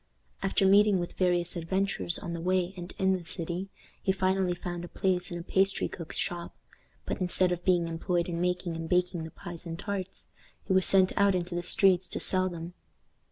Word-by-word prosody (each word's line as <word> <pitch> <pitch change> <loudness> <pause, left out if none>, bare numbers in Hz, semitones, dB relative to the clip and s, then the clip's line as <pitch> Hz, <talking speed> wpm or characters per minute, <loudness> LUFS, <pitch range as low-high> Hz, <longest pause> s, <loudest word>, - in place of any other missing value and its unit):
After 195 0 +1
meeting 200 +1 +6
with 175 -1 -3
various 175 -1 +1
adventures 175 0 0
on 170 - -5
the 170 - -4
way 185 +1 +1
and 180 0 -7
in 190 -2 +3
the 185 -2 -2
city, 175 +3 -4 0.3
he 190 - +2
finally 190 -1 +1
found 175 0 -5
a - - -6
place 180 0 0
in 175 - -5
a 170 - -6
pastry 195 +2 +1
cook's 165 -3 -7
shop; 175 -1 -3 0.5
but, - - -4
instead 180 0 +3
of 175 0 -2
being 175 -2 +3
employed 170 +1 -1
in 170 -1 -3
making 180 -1 -1
and 165 0 -5
baking 180 -2 +1
the - - -7
pies 175 +1 -9
and 165 0 -5
tarts, 195 -1 -5 0.4
he - - 0
was 185 -1 +5
sent 190 -1 +4
out 200 -1 +4
into 175 -1 -2
the 175 - -1
streets 185 +1 +3
to - - -3
sell 185 0 +1
them. 170 0 -7
180 Hz, 205 wpm, -29 LUFS, 175-190 Hz, 0.5 s, meeting